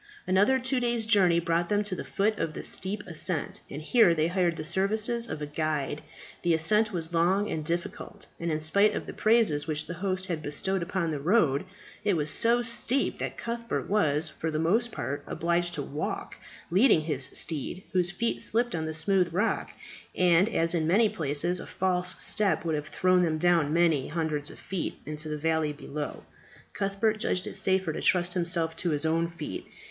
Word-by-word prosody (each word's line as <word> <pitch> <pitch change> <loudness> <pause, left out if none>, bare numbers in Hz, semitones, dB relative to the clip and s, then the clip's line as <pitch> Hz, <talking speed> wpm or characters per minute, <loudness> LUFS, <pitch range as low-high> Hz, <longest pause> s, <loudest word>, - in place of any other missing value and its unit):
Another 200 +8 +3
two 260 0 -1
days' 240 -2 -1
journey 190 -6 +4
brought 170 0 -1
them 205 0 +1
to 205 - -3
the - - -4
foot 210 +2 -1
of 165 -2 -3
the - - -6
steep 200 +2 -2
ascent, 170 -2 -2
and 145 +2 -7
here 185 -2 +4
they 155 0 +1
hired 175 -2 +1
the 155 - -6
services 215 +7 +1
of 150 - -5
a - - -2
guide. 150 -1 -2 0.4
The 170 -2 +2
ascent 210 +7 +2
was 170 -3 -4
long 185 +5 +1
and 155 - -3
difficult, 170 +3 -5
and 170 0 -2
in 155 - -1
spite 200 +7 +3
of - - -4
the - - -8
praises 215 -10 +2
which 155 -1 -2
the - - -6
host 185 +1 -3
had 170 -5 -4
bestowed 180 +6 -1
upon 170 -1 -2
the 150 - -3
road, 155 -3 +2 0.4
it 200 -4 +1
was 150 -1 +1
so 235 +1 +3
steep 235 +3 0
that - - -4
Cuthbert 235 0 -4
was, 160 -7 +2
for 160 - -5
the 155 - -2
most 215 +10 +1
part, 140 -7 -4
obliged 170 +1 -1
to 145 - -3
walk, 145 +3 -5 0.4
leading 190 -2 +5
his 145 -4 +3
steed, 165 +4 -1
whose 180 -1 +2
feet 230 +6 -1
slipped 240 +2 +1
on 160 -1 -2
the 160 - -4
smooth 180 +1 +1
rock, 205 +7 -1 0.4
and 180 +3 +4
as 165 -6 +3
in 160 -2 0
many 210 +6 +4
places 170 -1 +2
a - - -8
false 180 -1 -1
step 205 -4 +1
would 160 - 0
have 150 0 -3
thrown 185 0 +2
them 160 -3 0
down 165 -3 +2
many 165 -4 +2
hundreds 155 -2 -2
of - - -12
feet 190 -4 -4
into 155 +1 -2
the 150 - -3
valley 160 0 0
below, 145 0 -6 0.5
Cuthbert 205 +2 -1
judged 185 -3 -1
it - - -6
safer 190 -4 +1
to - - -5
trust 180 -1 +2
himself 170 -2 +2
to 175 - -1
his 150 -1 0
own 165 +1 +1
feet. 170 -3 -7
175 Hz, 195 wpm, -27 LUFS, 155-200 Hz, 0.5 s, leading